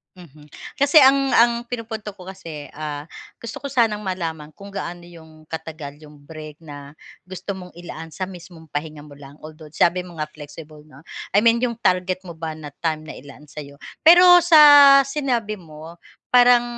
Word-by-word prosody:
Mhm. 150 -4 -17 0.2
Kasi 285 +3 +5
ang 275 0 +4
ang 235 0 +3
pinupunto 225 -3 -6
ko 190 -2 -15
kasi, 165 -6 -9
ah 150 0 -6 0.3
gusto 235 +3 -9
ko 280 - -5
sanang 225 -5 0
malaman 165 -5 -5
kung 200 +5 -14
gaano 175 -3 -7
'yong 160 -2 -17
katagal 160 -3 -8
'yong 150 -1 -16
break 155 -1 -11
na 145 -3 -12 0.3
gusto 185 +2 -7
mong 180 -1 -11
ilaan 165 -2 -10
sa 185 +3 -5
mismong 175 -3 -13
pahinga 150 0 -7
mo 145 - -14
lang. 140 +1 -15
Although 155 0 -13
sabi 180 +3 +1
mo 175 -3 -13
nga 155 - -3
flexible 155 0 -13
‘no, 150 -3 -18 0.3
I 205 - +4
mean 230 +2 +2
yung 235 -2 -2
target 185 -1 0
mo 170 - -9
ba 160 0 -6
na 150 -2 -11
time 155 -1 -3
na - - -9
ilaan 145 +2 -14
sayo. 140 0 -11 0.2
Pero 355 +1 +7
sa 290 -4 +8
sinabi 250 -7 -2
mo 160 -2 -13 0.3
parang, 245 -1 +5
170 Hz, 175 wpm, -21 LUFS, 155-225 Hz, 0.3 s, sa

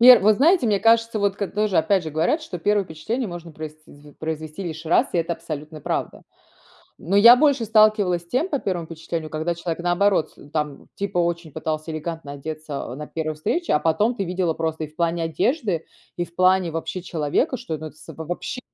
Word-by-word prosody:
Вер 245 -1 +10
вы 215 +2 +6
знаете, 315 - +4
мне 205 -2 +2
кажется, 230 0 +3
вот 200 0 +1
как 200 -2 -4
тоже, 210 -4 +2
опять 180 +3 +3
же 160 - -5
говорят, 170 - +1
что 180 - -6
первое 205 +3 +2
впечатление 205 +9 -3
можно 170 -2 -8
проис 155 0 -7
с 155 0 -30
с 145 - -16
з - - -19
произвести 155 +2 -5
лишь 165 -1 -6
раз- 165 - +4
и 175 - +1
это 165 +1 0
абсолютная 155 -1 -7
правда. - - -3 0.8
Но 195 +5 -1
я 235 +4 +10
больше 275 -4 +3
сталкивалась 215 -5 +4
с 170 - -21
тем, 265 - 0
по 285 - 0
первому 175 -7 -2
впечатлению, 160 -1 -5
когда 160 +2 -1
человек, 170 0 -4
наоборот, 175 0 +2
э, 145 - -15
там 150 -3 -3
типа 200 -3 -2
очень 170 -1 0
пытался 155 +2 -3
элегантно 155 -2 -5
одеться 150 -3 -6
на 150 +2 -7
1 155 -1 -3
встрече. 335 - -1
А - - +5
потом 165 +10 +2
ты 195 - -1
видела 180 -1 0
просто 160 -1 -2
и - - -4
в 155 - -25
плане 170 -1 0
одежды, 195 - 0 0.3
и 175 - -1
в 170 - -23
плане 185 -2 +3
вообще 165 +3 -3
человека, 175 - 0
что 165 -11 -5
это 155 +1 -5
абс 155 0 -12
вообще 175 +9 -5
170 Hz, 210 wpm, -23 LUFS, 155-205 Hz, 0.8 s, Вер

